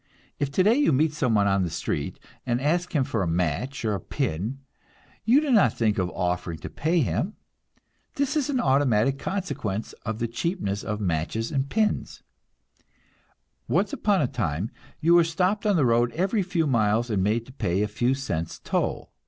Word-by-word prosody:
If 145 Hz, -, 0 dB
today 190 Hz, +9 st, +4 dB
you 290 Hz, -, +3 dB
meet 150 Hz, +3 st, +2 dB
someone 115 Hz, -8 st, +2 dB
on 100 Hz, -1 st, +2 dB
the 90 Hz, -, 0 dB
street 75 Hz, -2 st, -3 dB, 0.3 s
and 120 Hz, -1 st, 0 dB
ask 170 Hz, +6 st, 0 dB
him 140 Hz, -, +4 dB
for 125 Hz, -6 st, -2 dB
a 90 Hz, -, 0 dB
match 90 Hz, -, -1 dB
or 110 Hz, -, +1 dB
a 100 Hz, -, -2 dB
pin, 95 Hz, +11 st, -3 dB, 0.7 s
you 240 Hz, +6 st, +6 dB
do 300 Hz, -2 st, -1 dB
not 195 Hz, -, +4 dB
think 110 Hz, -3 st, +1 dB
of 90 Hz, -1 st, 0 dB
offering 90 Hz, -2 st, -1 dB
to -, -, -7 dB
pay 165 Hz, +3 st, +1 dB
him. 180 Hz, -, -1 dB, 0.8 s
This 280 Hz, +2 st, 0 dB
is 295 Hz, -2 st, 0 dB
an 265 Hz, -3 st, +1 dB
automatic 135 Hz, -, +2 dB
consequence 155 Hz, -, -3 dB
of 110 Hz, 0 st, -3 dB
the 115 Hz, 0 st, -1 dB
cheapness 115 Hz, -, -2 dB
of 105 Hz, 0 st, -3 dB
matches 90 Hz, -, -1 dB
and 140 Hz, -2 st, -1 dB
pins. 215 Hz, -1 st, -1 dB, 1.4 s
Once 195 Hz, +1 st, +1 dB
upon 200 Hz, -6 st, +2 dB
a -, -, +1 dB
time 95 Hz, -4 st, -2 dB, 0.3 s
you 165 Hz, +2 st, +4 dB
were 175 Hz, 0 st, +7 dB
stopped 185 Hz, +6 st, 0 dB
on 205 Hz, -, +3 dB
the 150 Hz, -6 st, +3 dB
road 120 Hz, 0 st, +3 dB
every 195 Hz, +5 st, +1 dB
few 175 Hz, -3 st, 0 dB
miles 115 Hz, -2 st, +1 dB
and 100 Hz, -3 st, +1 dB
made 110 Hz, +4 st, +1 dB
to 130 Hz, -, -14 dB
pay 95 Hz, -6 st, 0 dB
a -, -, 0 dB
few 120 Hz, +5 st, 0 dB
cents 85 Hz, -, -3 dB
toll. -, -, -2 dB
130 Hz, 185 wpm, -25 LUFS, 105-175 Hz, 1.4 s, were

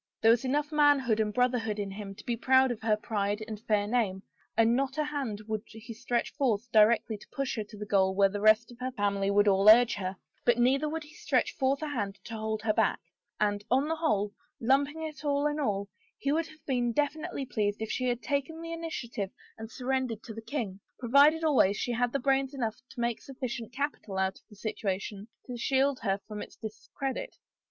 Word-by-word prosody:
There 225 Hz, -, +8 dB
was 235 Hz, +1 st, +3 dB
enough 290 Hz, +3 st, 0 dB
man 290 Hz, -1 st, +5 dB
hood 240 Hz, -5 st, 0 dB
and 215 Hz, -1 st, +1 dB
brotherhood 240 Hz, -2 st, +1 dB
in 200 Hz, -1 st, -3 dB
him 195 Hz, 0 st, -7 dB
to -, -, -13 dB
be 240 Hz, -2 st, 0 dB
proud 260 Hz, +2 st, +4 dB
of 230 Hz, -, -5 dB
her 220 Hz, -1 st, +2 dB
pride 210 Hz, -1 st, -2 dB
and 215 Hz, -2 st, -6 dB
fair 210 Hz, -2 st, +1 dB
name, 205 Hz, -4 st, 0 dB, 0.3 s
and 225 Hz, +1 st, +5 dB
not 270 Hz, +1 st, -1 dB
a 305 Hz, -, +2 dB
hand 275 Hz, -8 st, -3 dB
would 215 Hz, -1 st, -2 dB
he 225 Hz, +1 st, -10 dB
stretch 240 Hz, +1 st, -2 dB
forth 245 Hz, -5 st, 0 dB
directly 215 Hz, 0 st, +4 dB
to -, -, -15 dB
push 275 Hz, -2 st, -2 dB
her 220 Hz, -, -2 dB
to 210 Hz, 0 st, -13 dB
the 210 Hz, -, -5 dB
goal 190 Hz, -2 st, +2 dB
where 200 Hz, 0 st, +5 dB
the 205 Hz, +1 st, -4 dB
rest 215 Hz, +2 st, +5 dB
of 240 Hz, -, -14 dB
her 255 Hz, 0 st, -2 dB
family 200 Hz, -4 st, 0 dB
would 205 Hz, +1 st, +4 dB
all 195 Hz, +1 st, +6 dB
urge 240 Hz, +2 st, +8 dB
her, 190 Hz, 0 st, -4 dB, 0.3 s
but 240 Hz, -1 st, +4 dB
neither 270 Hz, +5 st, +3 dB
would 320 Hz, +1 st, -3 dB
he 295 Hz, +2 st, -15 dB
stretch 280 Hz, -5 st, 0 dB
forth 270 Hz, +3 st, +1 dB
a -, -, -1 dB
hand 205 Hz, -8 st, -3 dB
to 230 Hz, -, -8 dB
hold 220 Hz, 0 st, -3 dB
her 215 Hz, -1 st, +2 dB
back, -, -, +2 dB, 0.4 s
and, 205 Hz, -1 st, +1 dB
on 265 Hz, +4 st, +3 dB
the 325 Hz, +1 st, -1 dB
whole, 210 Hz, -10 st, 0 dB, 0.3 s
lumping 280 Hz, +6 st, +1 dB
it 310 Hz, -1 st, -6 dB
all 285 Hz, 0 st, +1 dB
in 295 Hz, 0 st, 0 dB
all« 200 Hz, -7 st, -1 dB, 0.3 s
he 280 Hz, -, -1 dB
would 325 Hz, +2 st, +1 dB
have 310 Hz, -1 st, -17 dB
been 245 Hz, -3 st, +1 dB
definitely 295 Hz, 0 st, -1 dB
pfeased 205 Hz, -4 st, -1 dB
if 220 Hz, 0 st, -3 dB
she 255 Hz, -, -1 dB
had 240 Hz, 0 st, -2 dB
takea 285 Hz, +3 st, -2 dB
the 330 Hz, 0 st, -5 dB
initiative 245 Hz, -, -4 dB, 0.3 s
and 220 Hz, 0 st, -8 dB
surrendered 255 Hz, -2 st, -2 dB
to 225 Hz, -, -8 dB
the 225 Hz, -, -7 dB
king 220 Hz, -7 st, -4 dB
— -, -, -48 dB
provided 285 Hz, +6 st, +5 dB
always 260 Hz, -10 st, +4 dB
she 245 Hz, -, -2 dB
had 245 Hz, +1 st, +1 dB
brains 270 Hz, 0 st, +1 dB
enough 230 Hz, -5 st, -2 dB
to 250 Hz, -, -11 dB
make 235 Hz, -1 st, -1 dB
sufficient 245 Hz, -4 st, -5 dB
capital 260 Hz, -7 st, -3 dB
out 190 Hz, 0 st, 0 dB
of -, -, -37 dB
the 210 Hz, -, -15 dB
situation 200 Hz, 0 st, -4 dB, 0.2 s
to 250 Hz, -, -6 dB
shield 270 Hz, +2 st, +1 dB
her 195 Hz, -2 st, 0 dB
from 210 Hz, -1 st, -6 dB
its -, -, -9 dB
dis 215 Hz, -1 st, -9 dB
credit. 270 Hz, -1 st, -3 dB
235 Hz, 225 wpm, -29 LUFS, 210-275 Hz, 0.4 s, There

